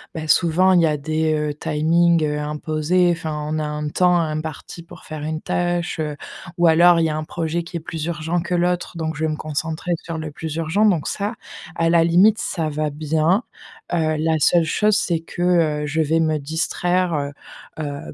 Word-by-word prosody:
bah, 155 Hz, -1 st, -5 dB
souvent 180 Hz, +3 st, +4 dB
il 175 Hz, -, +5 dB
y -, -, +4 dB
a 150 Hz, -, +1 dB
des, 155 Hz, +2 st, -1 dB
heu, 150 Hz, -1 st, -1 dB
timings, 165 Hz, +3 st, +2 dB
heu, 150 Hz, 0 st, -1 dB
imposés. 155 Hz, +4 st, 0 dB
Enfin, 155 Hz, -3 st, -3 dB
on 155 Hz, 0 st, -1 dB
a 155 Hz, -, -2 dB
un 150 Hz, 0 st, -3 dB
temps 180 Hz, +2 st, +3 dB
imparti 155 Hz, +1 st, -4 dB
pour -, -, -14 dB
faire 155 Hz, -1 st, -7 dB
une 155 Hz, +1 st, -3 dB
tâche, 175 Hz, -1 st, -1 dB
heu, 150 Hz, -2 st, -2 dB, 0.4 s
ou 175 Hz, 0 st, +4 dB
alors 170 Hz, +1 st, +6 dB
il 165 Hz, -, +2 dB
y -, -, +1 dB
a 155 Hz, -, -2 dB
un 155 Hz, -, -3 dB
projet 170 Hz, +1 st, -3 dB
qui 170 Hz, +1 st, -11 dB
est -, -, -1 dB
plus 160 Hz, -1 st, -5 dB
urgent 170 Hz, +1 st, -2 dB
que 175 Hz, +1 st, -2 dB
l'autre, 180 Hz, 0 st, -1 dB
donc 160 Hz, -2 st, -3 dB
je 160 Hz, -, -1 dB
vais 155 Hz, -, 0 dB
me 155 Hz, -, -3 dB
concentrer 155 Hz, +3 st, -4 dB
sur 165 Hz, -1 st, -5 dB
le 155 Hz, -1 st, -5 dB
plus 160 Hz, +1 st, -6 dB
urgent, 165 Hz, +6 st, +1 dB
donc 180 Hz, -8 st, +2 dB
ça, 205 Hz, +3 st, -2 dB, 0.4 s
à 165 Hz, 0 st, +1 dB
la 170 Hz, -1 st, +4 dB
limite, 195 Hz, +6 st, +5 dB
ça 160 Hz, -4 st, -2 dB
va 150 Hz, 0 st, -2 dB
bien. 155 Hz, -, +1 dB, 0.5 s
Heu, 155 Hz, -2 st, +1 dB
la 160 Hz, +1 st, +1 dB
seule 170 Hz, +2 st, +4 dB
chose, 210 Hz, +6 st, +2 dB
c'est 170 Hz, -5 st, 0 dB
que, 165 Hz, +1 st, -8 dB, 0.4 s
heu, -, -, -2 dB
je 160 Hz, +3 st, 0 dB
vais 160 Hz, +1 st, +1 dB
me 155 Hz, -1 st, +1 dB
distraire, 175 Hz, +4 st, -1 dB, 0.7 s
heu, 155 Hz, -, -2 dB
heu, 145 Hz, -1 st, -6 dB
160 Hz, 210 wpm, -21 LUFS, 155-175 Hz, 0.7 s, alors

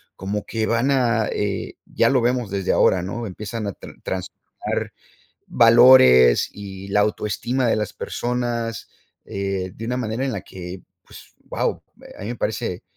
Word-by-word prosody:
como 100 Hz, +2 st, -4 dB
que 110 Hz, -1 st, -2 dB
van 115 Hz, +4 st, +1 dB
a, 120 Hz, -5 st, +2 dB
eh, 100 Hz, -1 st, -3 dB
ya -, -, +2 dB
lo 130 Hz, -2 st, +3 dB
vemos 120 Hz, -2 st, 0 dB
desde 95 Hz, -1 st, -1 dB
ahora, 90 Hz, -, +3 dB
¿no? 115 Hz, +5 st, -4 dB
Empiezan 105 Hz, +3 st, -5 dB
a 100 Hz, -, -3 dB
tra -, -, -12 dB
transformar 95 Hz, 0 st, -5 dB, 0.5 s
valores 115 Hz, -, +6 dB
y 100 Hz, -1 st, -9 dB
la 105 Hz, +1 st, +2 dB
autoestima 105 Hz, +5 st, -1 dB
de 115 Hz, -, +2 dB
las 105 Hz, -2 st, -3 dB
personas, 120 Hz, -2 st, -3 dB, 0.3 s
eh, 95 Hz, -2 st, -3 dB
de 115 Hz, -, -8 dB
una 125 Hz, +1 st, -1 dB
manera 120 Hz, +1 st, -2 dB
en 135 Hz, -, -2 dB
la 100 Hz, -5 st, -4 dB
que 90 Hz, 0 st, -9 dB, 0.2 s
pues -, -, -15 dB
wao, -, -, -2 dB, 0.2 s
eh, -, -, -13 dB
a -, -, -10 dB
mí -, -, -5 dB
me 120 Hz, -, -4 dB
parece 110 Hz, -5 st, -3 dB
110 Hz, 165 wpm, -22 LUFS, 95-120 Hz, 0.5 s, valores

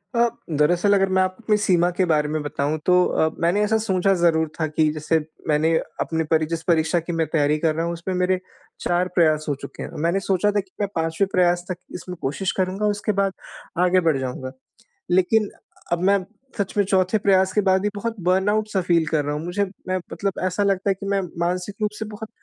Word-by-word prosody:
अ, 235 Hz, 0 st, +4 dB, 0.2 s
दरअसल 175 Hz, +7 st, +3 dB
अगर 195 Hz, -1 st, +3 dB
मैं 190 Hz, -, +4 dB
आपके 210 Hz, +4 st, 0 dB
सीमा 180 Hz, -4 st, +2 dB
के 185 Hz, -, +3 dB
बारे 150 Hz, -3 st, +2 dB
में 155 Hz, 0 st, -1 dB
बताऊँ 145 Hz, +1 st, -1 dB
तो 180 Hz, 0 st, +5 dB
अ, 160 Hz, -, +1 dB
मैंने 175 Hz, +5 st, +2 dB
ऐसा 220 Hz, +1 st, +2 dB
सोचा 195 Hz, -3 st, +1 dB
ज़रूर 160 Hz, -2 st, +3 dB
था 160 Hz, -, +1 dB
कि 155 Hz, 0 st, +2 dB
जैसे 155 Hz, +1 st, 0 dB, 0.3 s
मैंने 155 Hz, +2 st, +2 dB, 0.3 s
अपने 160 Hz, 0 st, -1 dB
परि 155 Hz, -1 st, +3 dB
जिस 165 Hz, -1 st, -3 dB
परीक्षा 165 Hz, 0 st, +3 dB
की 165 Hz, -1 st, -1 dB
तैयारी 150 Hz, -1 st, +1 dB
कर 160 Hz, -1 st, +1 dB
रहा 165 Hz, +1 st, -1 dB
हूँ 170 Hz, -, -2 dB
उसमें 170 Hz, +3 st, -4 dB
मेरे 180 Hz, 0 st, +1 dB, 0.4 s
4 175 Hz, +1 st, +1 dB
प्रयास 155 Hz, -3 st, +3 dB
हो 145 Hz, -, 0 dB
चुके -, -, -8 dB
हैं। -, -, -6 dB
मैंने 170 Hz, +4 st, +2 dB
सोचा 195 Hz, +1 st, +1 dB
था 205 Hz, -, +1 dB
कि 195 Hz, -1 st, -7 dB
मैं 200 Hz, -, +1 dB
5वें 165 Hz, +4 st, 0 dB
प्रयास 175 Hz, -1 st, +2 dB
तक 185 Hz, -, -3 dB, 0.2 s
इसमें 180 Hz, 0 st, -7 dB
कोशिश 170 Hz, +8 st, -1 dB
करूँगा 190 Hz, +2 st, 0 dB
उसके 205 Hz, 0 st, 0 dB
बाद 195 Hz, -1 st, +1 dB, 0.5 s
आगे 185 Hz, +1 st, +4 dB
बढ़ 155 Hz, -4 st, +3 dB
जाऊँगा। 130 Hz, 0 st, -4 dB, 0.6 s
लेकिन 200 Hz, +4 st, +3 dB, 0.4 s
अब 170 Hz, 0 st, +1 dB
मैं 200 Hz, 0 st, +4 dB, 0.4 s
सच 200 Hz, -3 st, -2 dB
में 205 Hz, -, +5 dB
4th 190 Hz, +2 st, +2 dB
प्रयास 190 Hz, -2 st, +3 dB
के 210 Hz, -, +3 dB
बाद 190 Hz, -1 st, +3 dB
भी 210 Hz, -, 0 dB
बहुत 225 Hz, +3 st, -3 dB
बर्नआउट 195 Hz, +4 st, +2 dB
सा 190 Hz, -, +1 dB
फ़ील 170 Hz, -2 st, +2 dB
कर 155 Hz, -1 st, +1 dB
रहा 145 Hz, -, -1 dB
हूँ। 150 Hz, -, -4 dB
मुझे 175 Hz, +4 st, 0 dB, 0.2 s
मैं 185 Hz, -, 0 dB
मतलब 200 Hz, -1 st, -2 dB
ऐसा 185 Hz, +2 st, 0 dB
लगता 195 Hz, 0 st, +1 dB
है 195 Hz, -, +4 dB
कि 195 Hz, -, -6 dB
मैं 200 Hz, -1 st, +1 dB, 0.2 s
मानसिक 180 Hz, +3 st, -1 dB
रूप 210 Hz, -, +1 dB
से 220 Hz, -, -3 dB
बहुत 215 Hz, +1 st, -8 dB
180 Hz, 215 wpm, -23 LUFS, 160-195 Hz, 0.6 s, तो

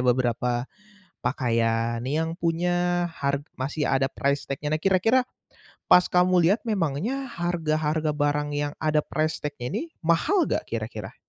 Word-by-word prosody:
beberapa 125 Hz, -1 st, +1 dB, 0.6 s
pakaian 115 Hz, -2 st, 0 dB
nih 150 Hz, +6 st, 0 dB
yang 165 Hz, -, -4 dB
punya 175 Hz, +1 st, 0 dB
har 140 Hz, 0 st, 0 dB, 0.2 s
masih 140 Hz, +3 st, -2 dB
ada 135 Hz, 0 st, +2 dB
price 140 Hz, 0 st, -1 dB
tag-nya, 145 Hz, +2 st, -2 dB
Nah 155 Hz, -, -1 dB
kira-kira 195 Hz, +7 st, +3 dB, 0.7 s
pas 180 Hz, -, +7 dB
kamu 180 Hz, -1 st, +4 dB
lihat 210 Hz, -, +2 dB
memangnya 215 Hz, -, -1 dB
harga-harga 155 Hz, -3 st, 0 dB
barang 145 Hz, 0 st, 0 dB
yang 145 Hz, 0 st, -1 dB
ada 155 Hz, -1 st, +2 dB
price 155 Hz, +1 st, -1 dB
tag-nya 140 Hz, -4 st, -5 dB
ini -, -, -2 dB, 0.2 s
mahal 170 Hz, -, +2 dB
enggak -, -, -1 dB
kira-kira? -, -, -5 dB
155 Hz, 140 wpm, -25 LUFS, 135-175 Hz, 0.7 s, pas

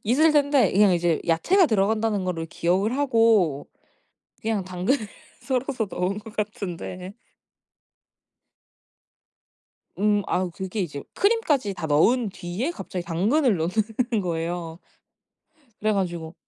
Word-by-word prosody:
있을 300 Hz, +8 st, +4 dB
텐데 285 Hz, -2 st, +3 dB
그냥 200 Hz, -1 st, +5 dB
이제 170 Hz, -2 st, +1 dB
야채가 345 Hz, -, +3 dB
들어간다는 215 Hz, -2 st, +1 dB
거를 165 Hz, -3 st, -3 dB
기억을 190 Hz, +9 st, 0 dB
하고 225 Hz, -, +2 dB, 0.7 s
그냥 220 Hz, -3 st, -1 dB
당근을 190 Hz, +6 st, -1 dB, 0.3 s
썰어서 255 Hz, -4 st, -2 dB
넣은 190 Hz, +3 st, -2 dB
것 215 Hz, 0 st, -13 dB
같은데. 190 Hz, -2 st, -5 dB, 2.8 s
음 205 Hz, 0 st, +2 dB
아우 180 Hz, -1 st, 0 dB
그게 190 Hz, +3 st, -4 dB
이제 145 Hz, -5 st, -4 dB
크림까지 315 Hz, -, +1 dB
다 165 Hz, -, -5 dB
넣은 215 Hz, +10 st, +3 dB
뒤에 185 Hz, -, -4 dB
갑자기 185 Hz, -, -6 dB
당근을 215 Hz, -, +2 dB
넣는 215 Hz, +6 st, -1 dB
거예요. 165 Hz, -1 st, -3 dB, 1.0 s
그래 215 Hz, 0 st, +2 dB
가지고 170 Hz, -4 st, -3 dB
205 Hz, 250 characters per minute, -24 LUFS, 175-235 Hz, 2.8 s, 그냥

